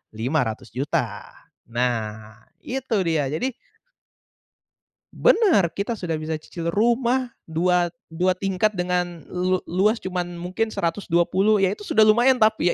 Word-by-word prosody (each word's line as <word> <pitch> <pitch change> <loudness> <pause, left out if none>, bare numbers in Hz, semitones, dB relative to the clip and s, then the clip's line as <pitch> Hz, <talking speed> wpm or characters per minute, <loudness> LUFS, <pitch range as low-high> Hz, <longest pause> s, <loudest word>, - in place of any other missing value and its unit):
Rp500.000.000 125 +1 -2 0.4
Nah 110 -3 -3 0.3
itu 260 -2 -4
dia, 160 -4 +1
jadi 160 - -2 1.6
Benar, 430 - +4
kita 200 +4 -1
sudah 170 -7 -3
bisa 155 +1 -4
cicil 170 +1 -5
rumah 240 +3 +2 0.2
dua 175 +1 +1 0.2
dua 180 +3 +1
tingkat 195 +3 0
dengan 180 -1 -1
lu 185 0 0
luas 210 +6 +2
cuman 180 -1 -3
mungkin 185 +6 -3
120 190 +3 +1
ya 190 - +4
itu 210 +1 -7
sudah 220 - +3
lumayan 240 +5 +5
tapi 215 -5 +3
180 Hz, 120 wpm, -23 LUFS, 160-215 Hz, 1.6 s, lumayan